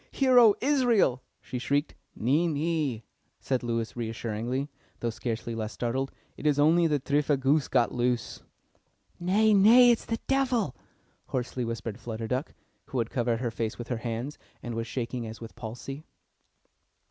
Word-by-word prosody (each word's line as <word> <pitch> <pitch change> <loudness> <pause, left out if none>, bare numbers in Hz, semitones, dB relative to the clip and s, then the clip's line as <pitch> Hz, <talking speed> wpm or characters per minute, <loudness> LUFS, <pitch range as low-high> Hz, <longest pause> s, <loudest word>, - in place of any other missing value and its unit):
"Hear, 260 -2 +4
O 225 -4 +7
Israel!" 240 - +3 0.2
she 125 - -5
shrieked. 145 +4 0 0.2
"Nee, 145 +10 +2
nee," 150 -6 -1 0.4
said 130 -2 -1
Lewis 115 -1 -2
reassuringly, 115 +3 -3 0.3
though 115 - -1
scarcely 115 0 -4
less 110 -1 -4
startled. 130 +3 -2 0.3
"It 150 - -2
is 145 -2 +3
only 165 +3 +5
the 150 -2 +1
tripha 145 +1 +1
goose 140 +2 +2
got 120 - +2
loose." 120 -1 -1 0.8
"Nay, 205 +5 +3
nay, 235 +5 +7
it 235 - +2
is - - -12
the 225 - -1
Devil!" 255 - +1 0.5
hoarsely 125 0 -2
whispered 115 -1 -4
Flutter 115 -2 -5
Duck, 130 +6 -2 0.3
who 130 - -5
had 115 -1 -1
covered 120 -2 0
her 120 -3 -1
face 110 -1 -3
with 120 - -7
her 120 - -1
hands, 120 +4 -4 0.2
and 120 - -4
was 115 +1 -3
shaking 120 -1 -3
as 110 0 -8
with 115 -1 -9
palsy. 125 +5 -7
130 Hz, 160 wpm, -28 LUFS, 115-160 Hz, 0.8 s, O